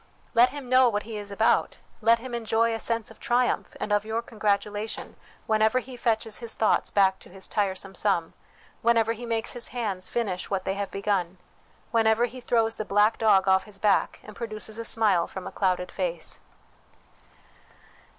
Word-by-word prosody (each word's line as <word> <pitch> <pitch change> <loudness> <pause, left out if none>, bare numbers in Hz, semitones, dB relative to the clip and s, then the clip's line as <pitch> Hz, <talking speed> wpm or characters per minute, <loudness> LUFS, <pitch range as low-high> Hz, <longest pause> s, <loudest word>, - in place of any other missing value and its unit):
Let 240 +2 +6
him 280 -1 -8
know 255 0 +5
what 210 -2 -2
he 225 0 -7
is 205 0 -6
about, 220 +3 +1 0.2
let 230 +1 +5
him 245 +1 -9
enjoy 230 0 +1
a 225 - -3
sense 230 -1 -1
of 225 - -16
triumph, 245 -1 0
and 210 - -3
of 205 0 +3
your 220 +2 -2
congratulation, 210 -1 -2 0.3
whenever 220 +2 +2
he 255 0 -4
fetches 225 -2 -1
his 235 -2 -3
thoughts 220 - +2
back 190 -1 +3
to - - -14
his 190 +1 -6
tiresome 195 -2 -1
sum, 175 -4 0 0.5
whenever 230 -1 +3
he 235 +1 -8
makes 225 -1 -1
his 240 -2 -2
hands 210 -7 -3
finish 200 -6 -2
what 195 -2 -2
they 190 - 0
have 200 0 -3
begun, 195 -3 -1 0.5
whenever 225 0 +3
he 250 +2 -9
throws 225 -2 +1
the - - -2
black 210 +2 +2
dog 200 -4 +4
off 190 0 +4
his 210 -2 -11
back, 205 0 +1
and 215 - -12
produces 220 -1 -4
a 230 - -4
smile 200 -8 +2
from 190 -1 -8
a - - -6
clouded 185 -2 0
face. - - -2
220 Hz, 180 wpm, -26 LUFS, 200-230 Hz, 0.5 s, Let